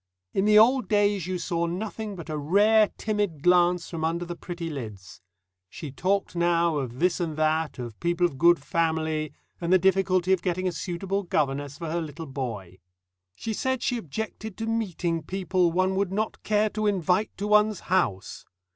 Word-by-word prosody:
In 195 - +1
the 210 0 +6
old 250 +4 +5
days 205 -4 +2
you 185 0 -2
saw 170 0 -1
nothing 210 +3 -4
but 170 -3 -9
a 155 - -3
rare 205 +8 +4
timid 205 -9 -2
glance 180 -1 +4
from 165 -2 -5
under 170 +2 -1
the 175 0 -6
pretty 170 -1 -6
lids. 105 - -8 0.5
She 145 - -8
talked 185 +7 -1
now 170 -2 +2
of 125 -3 -4
this 180 +6 +1
and 160 -3 -3
that, 155 0 0
of 120 -4 -7
people 175 +1 +1
of 140 -6 -3
"good 170 +1 +6
family," 160 0 -1 0.3
and 170 +1 -1
the 185 - +7
difficulty 190 0 +2
of 185 - +1
getting 185 +1 -1
a - - 0
suitable 185 +3 -3
governess 145 -5 -1
for 165 0 -5
her 170 +1 -1
little 160 +1 -7
boy. 115 - -6 0.6
She 220 - -4
said 260 +2 -1
she 245 - 0
objected 220 +3 -6
to 225 - -3
meeting 185 -7 -1
people 180 0 0
"one 185 +2 +1
would 195 -1 0
not 215 +3 -2
care 215 0 +1
to 215 0 -1
invite 190 +1 +1
to 200 - -3
one's 210 -1 +3
house." 125 - -1
175 Hz, 180 wpm, -26 LUFS, 160-200 Hz, 0.6 s, the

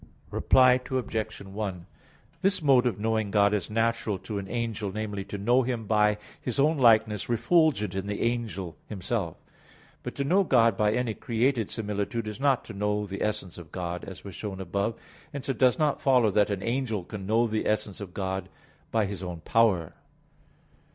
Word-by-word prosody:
Reply 130 -1 +5
Obj. 110 -4 -2
1: 95 -3 -5 0.6
This 195 +1 +2
mode 130 -3 +5
of 105 -5 -2
knowing 110 -1 0
God 100 0 +3
is 105 -3 -1
natural 115 -2 0
to 100 +2 -5
an 95 0 -7
angel 115 -4 -2
namely, 105 -1 -4
to 100 - -6
know 120 +6 +3
Him 120 -3 -2
by 105 0 +3 0.2
His 125 +2 -2
own 150 +2 +3
likeness 110 -4 +4
refulgent 120 - +2
in 95 +1 -3
the 100 0 -2
angel 110 -8 -2
himself. 95 -3 -3 0.6
But - - -6
to 140 - -1
know 185 +8 +3
God 115 - +4
by 105 +1 +2
any 125 -2 0
created 115 0 0
similitude 105 +1 -3
is 105 +2 -6
not 135 -3 +2
to - - -8
know 105 +1 -1
the 100 0 -6
essence 105 -5 -2
of 85 -1 -12
God, 90 -1 -4
as 90 -6 -9
was 100 - -8
shown 95 0 -6
above 100 +4 -1
(A. - - -24
2). - - -24 0.3
Hence 140 0 -5
it 135 - -1
does 125 -2 +4
not 150 -2 +1
follow 125 -5 +4
that 105 +1 +3
an 100 -2 -2
angel 115 -5 -1
can 95 +1 -7
know 115 +3 +3
the 110 -1 -1
essence 105 -1 -1
of 100 -3 -7
God 95 -1 -3 0.4
by 110 -2 +1
his 100 -2 -5
own 90 -3 -6
power. 100 -6 +2
105 Hz, 190 wpm, -27 LUFS, 100-120 Hz, 0.6 s, Reply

